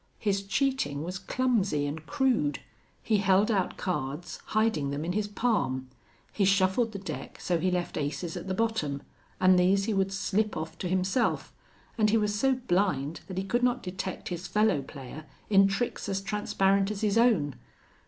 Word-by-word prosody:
His 200 -2 0
cheating 215 - 0
was 180 +3 -4
clumsy 205 - 0
and 150 +2 -4
crude. 255 - +1 0.5
He 220 - +2
held 195 +2 +3
out 195 -4 0
cards, 150 -2 -3
hiding 215 -10 +1
them 145 +3 -3
in 175 - -1
his 210 +1 0
palm; 205 - 0 0.4
he 205 - +1
shuffled 195 +4 +3
the 205 - -5
deck 195 0 -7
so 175 -2 0
he 185 - +1
left 180 -1 -2
aces 155 +3 -3
at - - -6
the 190 - -1
bottom, 185 -11 -1 0.4
and 185 0 +5
these 195 +2 +3
he 220 - 0
would 195 -1 +1
slip 205 +2 0
off 160 +1 -5
to 180 - -2
himself, 185 +6 0 0.5
and 215 -1 +4
he 225 - +4
was 210 -1 +1
so 265 +6 +2
blind 175 - 0
that 185 -1 -7
he 190 - 0
could 240 +6 0
not 250 0 +1
detect 185 0 -5
his 175 0 -4
fellow 210 -8 +2
player 140 +2 -9 0.3
in 195 -1 +7
tricks 200 +2 -2
as 195 -1 0
transparent 195 -1 +1
as 210 -1 -4
his 210 -2 +1
own. 195 - +3
195 Hz, 180 wpm, -28 LUFS, 175-215 Hz, 0.5 s, in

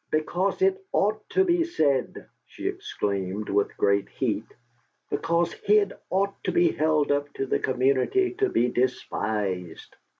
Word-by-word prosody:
"Because 180 - 0
it'd 385 0 +3 0.2
OUGHT 215 +2 0
to 380 - +3
be 345 -2 +2
said!" 145 - 0 0.2
she - - -6
exclaimed, 100 +1 -3
with 100 0 0
great 100 0 +2
heat. - - -2 0.6
"Because 170 0 0
he'd 205 -1 +2 0.2
ought 195 +1 +1
to - - +1
be 350 0 +3
held 155 -2 +1
up 145 0 0
to 135 - -2
the - - 0
community 135 - +1
to 400 -2 +3
be 120 - +2
despised. 105 -8 -2
150 Hz, 140 wpm, -26 LUFS, -, 0.6 s, it'd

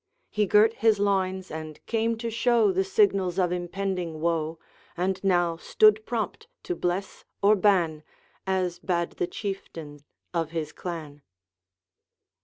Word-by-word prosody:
He 210 -1 +1
girt 215 +3 +5
his 225 -2 +3
loins, 190 -2 0
and 155 -1 -7
came 230 0 0
to 230 0 -4
show 230 -2 +3
The 190 +1 +1
signals 195 -2 +2
of 180 -2 +2
impending 180 -2 -3
woe, 165 -1 -1 0.4
And 185 +3 -1
now 175 -3 +2
stood 215 +4 +4
prompt 240 - -3 0.2
to 360 - -3
bless 185 - -3 0.2
or 205 +2 +6
ban, 180 -6 +2 0.5
As 185 -2 0
bade 170 -2 -1
the 175 - 0
Chieftain 165 -8 -6 0.3
of 165 -2 -1
his 160 -2 -4
clan. 155 -5 -7
185 Hz, 135 wpm, -26 LUFS, 170-210 Hz, 0.5 s, or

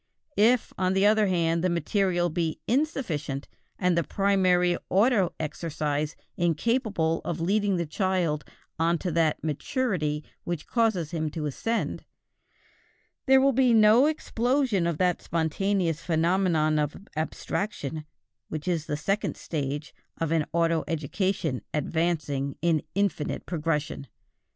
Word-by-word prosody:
If, 230 +3 +3
on 185 0 +2
the 195 +1 +3
other 215 0 +4
hand, 170 -2 +1
the 185 - +3
material 175 +1 +1
be 165 -1 -1
insufficient, 220 - -1 0.3
and 180 -2 +2
the 170 - +2
primary 185 -2 +2
auto 200 -2 +3
exercise 155 -1 -2 0.2
incapable 175 - +1
of 170 -1 -3
leading 200 +3 +1
the 170 - -1
child 170 -2 0 0.4
on 170 +1 +2
to 180 +1 -3
that 160 -1 +1
maturity 155 - -1 0.2
which 170 -3 -4
causes 220 -9 +1
him 160 -2 -1
to 150 0 -4
ascend, 225 - -2 1.2
there 265 0 +7
will 275 +1 +4
be 250 -2 +4
no 220 +5 +6
explosion 250 - +1
of 170 -3 -1
that 180 0 +1
spontaneous 165 +1 0
phenomenon 165 -2 +2
of 150 -1 -1 0.2
abstraction 155 -1 -3 0.4
which 155 +3 -5
is 165 -4 -1
the 150 - -1
second 195 +7 -1
stage 145 -1 -4 0.2
of 165 -1 -2
an 160 -2 +1
auto 165 -1 +2
education 165 - -1
advancing 150 -3 -1
in 165 -3 +3
infinite 200 -6 -1
progression. 150 -4 -2
170 Hz, 125 wpm, -27 LUFS, 155-200 Hz, 1.2 s, there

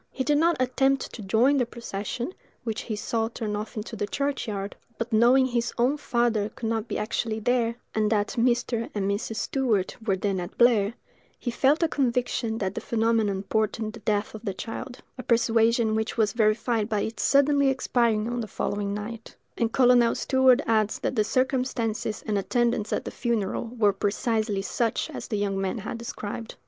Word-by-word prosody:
He 260 - -3
did 295 +1 +2
not 335 +1 +3
attempt 270 +1 +1
to 230 - -7
join 230 +8 +3
the 250 - +2
procession, 235 - -5 0.3
which 225 -3 -3
he 220 - -4
saw 225 +1 -1
turn 220 -2 -4
off 215 +2 -5
into 215 +2 -5
the 205 -1 -2
churchyard: 215 -6 -3 0.2
but 230 0 -4
knowing 245 +4 +5
his 240 -1 -1
own 250 +4 +3
father 235 -6 0
could 225 +1 -6
not 225 0 -1
be - - -3
actually 215 +1 -2
there, 235 0 +1 0.2
and 215 -1 +1
that 210 -1 +2
Mr. 240 -1 0
and 195 -2 0
Mrs. 205 +3 -2
Stewart 225 -6 0
were 200 -4 +1
then 195 0 -1
at 175 - -7
Blair, 230 -3 +4 0.4
he 240 - -3
felt 275 +7 +3
a - - +4
conviction 245 -5 0
that 190 -3 -2
the - - -4
phenomenon 220 -4 +1
portended 215 +1 -1
the 230 - -9
death 210 0 -1
of 220 0 -9
the 195 -4 -3
child: 245 +4 -6 0.2
a - - -2
persuasion 230 -1 +3
which 220 +2 -2
was 210 -3 +2
verified 220 0 +1
by 210 -2 0
its 225 +1 -3
suddenly 280 0 +4
expiring 235 -4 +1
on 240 0 -2
the 220 - -5
following 200 0 -2
night;—and 225 +1 -5
Colonel 245 -2 +5
Stewart 260 -1 +4
adds 215 -2 +2
that - - -2
the 215 - +3
circumstances 250 -3 -1
and 210 -2 0
attendants 235 0 0
at - - -1
the - - -4
funeral 230 -4 -1
were 205 -3 +4
precisely 210 -1 -1
such 225 +3 -1
as - - -6
the 215 - -2
young 200 -1 -1
man 195 +4 -1
had 220 +2 -5
described. 225 -1 -6
225 Hz, 185 wpm, -26 LUFS, 210-245 Hz, 0.4 s, knowing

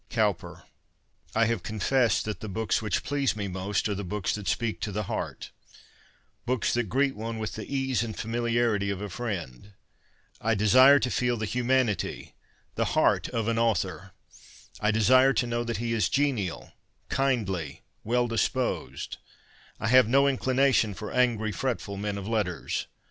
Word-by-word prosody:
Cowper. - - -1 0.7
I 115 +1 +4
have 115 -4 0
confessed 110 +4 +1
that 105 -1 -4
the 110 - -6
books 110 +3 0
which 105 - -1
please 140 -4 0
me 100 -2 -3
most 95 +3 -2
are 105 - -1
the 100 +1 -4
books 100 +1 -2
that 105 -3 -5
speak 115 +3 -1
to 105 - -2
the 105 +2 -2
heart - - -5 0.5
— - - -34
books 125 -2 0
that 120 -4 0
greet 135 +3 +1
one 115 +1 -5
with 110 -1 -4
the 110 - -7
ease 135 -3 0
and 115 -2 -4
familiarity 115 -3 0
of 100 -2 -2
a 105 0 -5
friend. 95 - -5 0.7
I 115 +1 +1
desire 130 +7 +7
to 125 -2 -1
feel 125 -1 +1
the 110 - -2
humanity, 120 - 0 0.4
the - - -1
heart - - +3
of 115 -1 -2
an 115 0 +1
author. 95 -4 -1 0.7
I 105 - +1
desire 130 +5 +5
to 125 - +1
know 120 0 -1
that 115 -1 -2
he 115 +1 -2
is 110 -6 +1
genial, 130 -11 -1 0.4
kindly, 95 - -1 0.2
well 120 +2 +1
disposed. 120 +3 -2 0.6
I 110 - -1
have 130 -2 +6
no 140 +4 +4
inclination 130 -5 +2
for 105 - -6
angry, 115 -4 +1
fretful 110 -4 -3
men 100 0 -3
of 100 0 -6
letters. 105 -7 -2
115 Hz, 165 wpm, -27 LUFS, 105-125 Hz, 0.7 s, desire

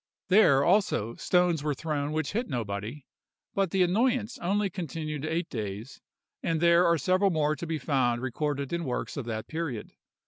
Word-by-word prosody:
There, 160 -9 +6
also, 170 - +2
stones 180 -1 +2
were 150 -1 -1
thrown 150 -1 -2
which 155 -2 -1
hit 230 +2 -2
nobody, 115 +2 -4 0.5
but 195 -2 +1
the 190 +2 +3
annoyance 230 +5 +1
only 200 +3 +1
continued 155 -5 -5
eight 165 +3 -1
days; 105 +2 -6 0.4
and 165 -1 0
there 170 +1 +5
are 170 0 +4
several 185 +6 +2
more 155 -3 +1
to 170 - -6
be 160 0 -1
found 130 -4 +1
recorded 140 +3 -2
in 170 0 -1
works 125 -5 -3
of 140 -5 -4
that 110 -2 -4
period. 160 -9 -4
155 Hz, 170 wpm, -28 LUFS, 135-180 Hz, 0.5 s, There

